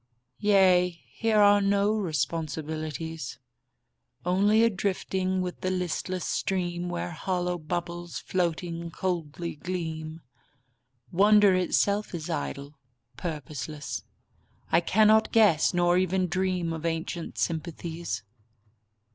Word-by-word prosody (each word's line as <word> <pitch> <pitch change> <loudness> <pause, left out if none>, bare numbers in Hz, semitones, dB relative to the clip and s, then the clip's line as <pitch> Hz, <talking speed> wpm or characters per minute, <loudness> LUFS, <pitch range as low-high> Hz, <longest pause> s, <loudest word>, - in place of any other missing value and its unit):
Yea, 190 -3 +5 0.2
here 225 -1 +1
are 205 0 +6
no 200 +1 +2
responsibilities. 160 - -3 0.9
Only 205 +5 +4
a 230 - +5
drifting 190 -1 -1
with 180 -1 -5
the 185 - 0
listless 180 0 -2
stream 175 -2 -1
Where 175 0 -3
hollow 180 +1 -2
bubbles, 175 +2 -4
floating, 170 -1 -2
coldly 170 -2 -3
gleam. 160 -2 -5 0.9
Wonder 205 +2 +6
itself 200 +2 +1
is 155 -2 -5
idle, 140 - -4 0.4
purposeless; 150 -2 -5 0.7
I 165 - +5
cannot 215 +4 +4
guess 210 -9 +5
Nor 175 0 +3
even 185 0 +1
dream 180 -1 -1
of 160 -1 -6
ancient 165 +1 -3
sympathies. 165 - -3
175 Hz, 100 wpm, -27 LUFS, 160-190 Hz, 0.9 s, are